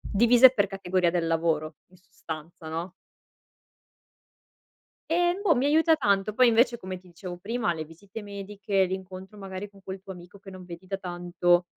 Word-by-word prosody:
divise 240 +4 +6
per 205 -3 +2
categoria 185 -2 0
del 170 -1 0
lavoro 160 -2 0
in 185 - -21
sostanza 160 -2 -9
no? 165 +3 -4 2.2
E, 350 +2 +2
boh, 365 -7 +4
mi 255 +2 +1
aiuta 320 +2 +4
tanto. 205 -6 +1
Poi 255 +1 +5
invece 235 +1 +4
come 185 -3 -6
ti 185 - -21
dicevo 175 +1 -8
prima, 220 -1 -1
le 160 -1 -5
visite 190 +7 -11
mediche, 200 -1 -1
l'incontro 190 +2 -7
magari 195 0 -7
con 200 -1 -19
quel 190 0 -6
tuo 190 0 -8
amico 180 +2 -14
che 195 0 -12
non 185 -1 -10
vedi 180 +1 -10
da 195 - -2
tanto, 175 -1 +1
190 Hz, 170 wpm, -27 LUFS, 175-210 Hz, 2.2 s, divise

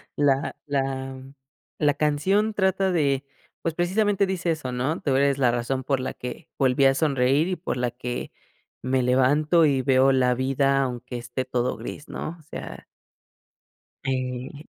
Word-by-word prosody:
la 140 -1 +1
la 135 -2 -2 0.6
la 150 -2 +3
canción 185 +9 +1
trata 190 -1 +1
de 140 -5 +1 0.4
pues 165 - -1
precisamente 200 +4 +1
dice 180 -2 -1
eso, 150 -6 -3
¿no? 130 +7 -1
"Tú 135 -3 +1
eres 140 0 +2
la 125 - +4
razón 120 +2 -2
por 135 0 0
la 130 - -3
que 125 -1 -8
volví 135 0 +3
a 135 - +6
sonreír 140 +1 +2
y 185 - -1
por 160 -6 -4
la 125 0 0
que 125 0 -5 0.5
me 130 +1 +1
levanto 145 +6 +3
y 140 -3 +2
veo 130 0 +4
la 125 -2 +3
vida 135 +2 +2
aunque 125 -1 -5
esté 120 +2 -4
todo 125 -1 -1
gris", 145 - -8
¿no? 165 - -5
O - - -19
sea 155 - -8 1.2
Eh. 130 +2 -3
135 Hz, 160 wpm, -25 LUFS, 130-155 Hz, 1.2 s, a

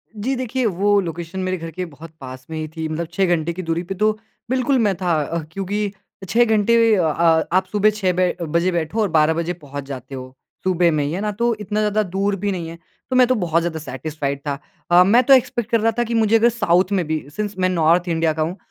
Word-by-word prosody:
जी। 245 +6 -2
देखिए 255 0 -2
वो 205 0 +2
लोकेशन 170 +1 -6
मेरे 185 0 -1
घर 165 0 -7
के 180 +3 -4
बहुत 160 0 -12
पास 130 0 -9
में 160 - -5
ही 155 - -3
थी 160 -1 -3
मतलब 160 +1 -3
6 195 - +2
घंटे 165 +1 -3
की 185 - -5
दूरी 165 +1 -2
पे। 195 +2 -5
तो 215 +3 +2 0.4
बिल्कुल 260 +1 +1
मैं 205 -5 +2
था 175 -2 +1
अ, 170 +4 -3
क्योंकि 200 +3 -2 0.4
6 240 +4 +4
घंटे 225 +1 +3
अ, 180 - +2 0.5
आप 185 +2 +2
सुबह 210 0 +4
6 205 -3 0
बै 180 0 +1
बजे 170 +3 0
बैठो 170 +6 -1
और 210 - +2
12 160 0 +3
बजे 170 +2 -2
पहुँच 145 -4 -8
जाते 135 -1 -8
हो 130 0 -9 0.3
सुबह 180 -2 +2
में 150 -2 0
ही 145 - -2
है 185 +4 -3
ना। 210 - -1
तो 235 +3 0
इतना 210 +1 -2
ज़्यादा 215 0 +1
दूर 200 +1 +1
भी 205 +1 -1
नहीं 175 -3 -4
है 165 - -9 0.3
तो 255 - -1
मैं 255 -1 +6
तो 255 - +2
बहुत 170 -4 +1
ज़्यादा 165 -2 -3
सेटिस्फाइड 140 0 -4
था। 140 0 -2 0.3
अ, 175 +1 +8
मैं 230 +7 +4
तो 275 - +6
एक्सपेक्ट 240 -3 +2
कर 230 - +4
रहा 225 +1 +3
था - - +3
कि 235 0 -4
मुझे 225 -1 +3
अगर 235 +2 +4
साउथ 185 -5 +1
में 175 - -1
भी 155 -1 -2
सिंस 210 -1 -3
मैं 185 0 +2
नॉर्थ 170 +1 +2
इंडिया 165 -1 +1
का 155 - -3
हूँ। 170 +5 -2
180 Hz, 245 wpm, -21 LUFS, 160-210 Hz, 0.5 s, अ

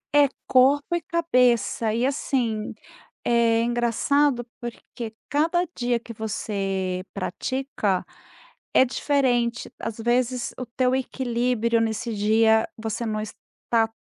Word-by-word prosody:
É 290 -1 +6 0.2
corpo 280 +6 +4
e 345 - -1
cabeça, 250 -9 +2
e 235 +3 +1
assim, 245 -6 -1 0.5
é 230 -1 +3
engraçado 240 +3 +2 0.2
porque 235 -1 -7
cada 325 +4 +2
dia 240 -1 0
que 230 - -9
você 195 -4 -2
pratica, 210 -1 -2 0.7
é 260 - +7
diferente, 245 -3 0
às 225 - -4
vezes, 245 +2 0
o 255 - -4
teu 255 0 +3
equilíbrio 240 -3 0
nesse 225 +1 -1
dia 220 +2 +3
você 225 +1 -3
não 215 -1 -1
está 225 +1 -2
235 Hz, 110 wpm, -24 LUFS, 220-260 Hz, 0.7 s, é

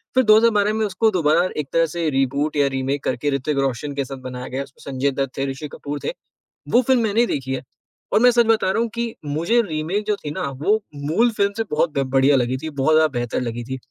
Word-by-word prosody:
फिर 260 - +5
2012 215 -1 +4
में 220 0 0
उसको 220 +2 +1
दोबारा 170 0 +2
एक 150 -2 -2
तरह 165 0 +4
से 165 0 -2
रीबूट 140 +2 0
या 140 -1 +4
रीमेक 135 +1 -2
करके 130 +3 -1
ऋतिक 140 +2 -1
रोशन 135 +1 -1
के 140 -1 -1
साथ 135 +1 -7
बनाया 125 0 -6
गया 135 +2 -3
उसमें 140 0 -11
संजय 135 +2 +1
दत्त 135 0 -3
थे, 135 - 0
ऋषि 150 +3 -6
कपूर 145 0 -5
थे, - - -1 0.6
वो 245 - +4
फ़िल्म 255 -1 +2
मैंने 225 +2 +2
देखी 135 - -3
है। - - -4 0.5
और 210 - +4
मैं 245 +1 +7
सच 235 -1 +3
बता 220 -4 +2
रहा 225 - +1
हूँ 235 - -1
कि 235 -1 -3
मुझे 165 +11 +1
रीमेक 175 +4 -2
जो 210 -1 +1
थी 145 - -3
ना - - -4 0.2
वो 215 +4 +2
मूल 160 +12 +1
फ़िल्म 200 -2 +1
से 225 - 0
बहुत 155 +2 +1
ब - - +3
बढ़िया 135 +1 +4
लगी 125 +1 0
थी, 160 +4 -6
बहुत 145 +2 +1
ज़्यादा 155 0 +5
बेहतर 120 -1 -2
लगी 120 -1 -4
थी। 130 +2 -5
150 Hz, 240 wpm, -21 LUFS, 135-210 Hz, 0.6 s, मैं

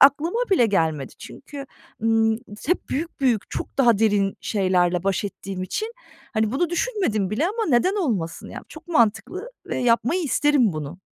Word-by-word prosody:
aklıma 300 - +5
bile 350 -12 +5
gelmedi. 160 - 0
Çünkü, 280 0 -9 0.4
ımm, 225 0 +3 0.3
hep 355 +4 0
büyük, 320 +2 -4
büyük, 240 -6 +1
çok - - -5
daha 235 -6 +5
derin 205 -3 +2
şeylerle 180 -3 +1
baş 195 +1 0
ettiğim 195 -1 -5
için, 435 - -3 0.4
hani, 220 0 +1
bunu 330 +5 0
düşünmedim 345 - 0
bile 285 +11 +1
ama 440 +3 -1
neden 320 +8 +3
olmasın? 200 - -2
Ya - - -7
çok - - -13
mantıklı 345 - +1 0.2
ve - - -3
yapmayı 245 +8 +2
isterim 285 - +3
bunu. 155 +3 -6
230 Hz, 155 wpm, -23 LUFS, 195-320 Hz, 0.4 s, aklıma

